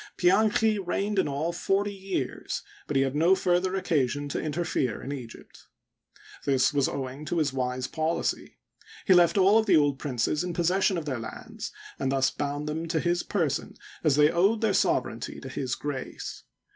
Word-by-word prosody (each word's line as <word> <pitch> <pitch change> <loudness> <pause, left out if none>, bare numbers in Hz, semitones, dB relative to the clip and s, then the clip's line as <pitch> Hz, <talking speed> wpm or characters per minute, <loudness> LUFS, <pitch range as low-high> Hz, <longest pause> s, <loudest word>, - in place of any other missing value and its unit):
Pianchi 210 +3 +3
reigned 200 +2 -1
in - - +2
all 150 +4 -2
forty 195 +3 0
years, 190 -9 -4 0.2
but 145 - -3
he 135 - +4
had 135 +1 -2
no 170 +5 +5
further 185 0 +1
occasion 145 -6 0
to - - -2
interfere 150 -6 -1
in 135 - -6
Egypt. 125 -5 -10 0.8
This 135 0 +2
was 140 -2 +2
owing 135 +1 -5
to 175 - -2
his 150 -4 +1
wise 125 -1 -2
policy. 160 +4 -2 0.5
He 190 - +6
left 175 +1 +5
all 200 +3 +6
of 220 - -1
the 190 - +6
old 145 -3 +2
princes 140 +3 -1
in, 180 -1 -3
possession 185 +2 +2
of 165 - -4
their 130 -5 -2
lands, 110 -1 -7 0.3
and 135 -1 0
thus 135 -1 +2
bound 145 +1 -3
them 160 +2 -3
to 165 0 0
his 175 +1 +1
person 160 -9 -2 0.3
as 150 -4 +4
they 150 +1 +5
owed 200 +6 +2
their 220 -3 +2
sovereignty 115 -8 0
to 135 - -8
his 130 -2 -2
grace. 145 -3 -6
155 Hz, 180 wpm, -27 LUFS, 135-185 Hz, 0.8 s, He